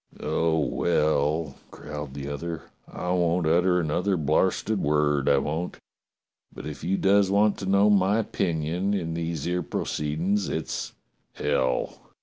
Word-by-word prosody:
"Oh, 80 -1 0
well," 75 -1 +1
growled 75 -2 -8
the 70 -1 -5
other, 80 +3 -5 0.3
"I 90 - -3
won't 85 -1 +1
utter 90 +3 +3
another 90 +4 0
blarsted 95 +6 +1
word, 75 -1 +2
I 70 - +5
won't. 80 +6 -2 0.7
But - - -10
if - - -7
you 95 +3 0
does 100 0 +3
want 105 +1 +3
to 95 - -5
know 100 +1 +5
my 100 +1 +3
opinion 90 -2 -1
in 85 -4 -2
these 85 -2 -3
'ere 90 +1 0
proceedin's, 85 +9 -1
it's - - -4 0.2
— - - -46
hell 65 -3 -1
85 Hz, 140 wpm, -26 LUFS, 75-95 Hz, 0.7 s, I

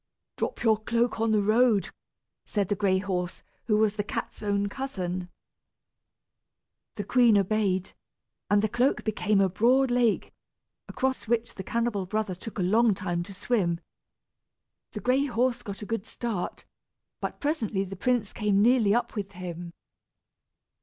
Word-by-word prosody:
"Drop - - -3
your 220 -2 +4
cloak 235 +2 0
into 220 -1 +2
the 205 - +2
road," 220 -1 +3 0.5
said 200 -3 -1
the 205 - +2
gray 190 -1 +2
horse, 185 -2 -3 0.2
who 210 -2 +2
was 215 -1 +2
the 205 - 0
cat's 210 - -5
own 200 -1 0
cousin. 185 -8 -4 1.7
The 205 - -3
queen 235 +1 +5
obeyed, 195 -2 +1 0.6
and 205 0 +4
the - - +3
cloak 245 +6 +1
became 215 -1 +1
a 195 - +4
broad 245 +8 +3
lake, 240 -3 +1 0.5
across 260 -2 -2
which 235 +1 0
the - - -6
cannibal 230 -3 -1
brother 215 -1 -1
took 210 +5 -9
a 185 - 0
long 215 +3 +4
time 175 -2 -2
to 195 +3 -8
swim. 185 -6 0 1.1
The - - -5
gray 260 +3 +2
horse 245 -1 0
got 200 -2 -7
a - - -5
good 225 -1 -3
start, 220 -7 -4 0.5
but - - -4
presently 230 -10 -1
the 195 0 -7
prince 230 +1 0
came 210 -3 +1
nearly 225 -2 +4
up 240 - 0
with 200 -3 -5
him. 175 -1 -6
210 Hz, 155 wpm, -27 LUFS, 195-235 Hz, 1.7 s, queen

